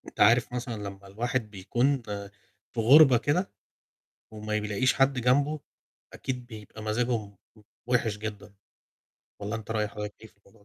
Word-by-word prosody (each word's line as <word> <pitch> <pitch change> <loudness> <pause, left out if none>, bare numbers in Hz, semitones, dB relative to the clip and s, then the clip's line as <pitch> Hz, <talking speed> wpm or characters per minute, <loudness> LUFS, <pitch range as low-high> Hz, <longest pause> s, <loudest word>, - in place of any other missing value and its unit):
أنت - - -17
عارف 120 +1 +5
مثلًا 125 -1 -3
لمّا 100 0 -8
الواحد 115 +2 -2
بيكون 120 +7 0
آآ 100 -1 -5 0.4
في 120 - -3
غُربة 135 +1 +8
كده، 150 +10 0 0.8
وما 105 0 -2
بيلاقيش 105 +5 +1
حد 135 -1 +2
جنبه، 140 +5 +2 0.5
أكيد 125 -2 -5
بيبقى 110 -2 -10
مزاجه 120 +3 0
م 100 0 -19 0.5
وحِش 115 -4 +1
جدًا، 105 -1 -7 0.9
والّا 105 +2 -3
أنت 110 0 -9
رأي 105 -2 0
حضرتك 105 0 -6
إيه - - -9
في - - -27
الموضوع 100 - -38
ده؟ - - -20
110 Hz, 160 wpm, -28 LUFS, 105-125 Hz, 0.9 s, غُربة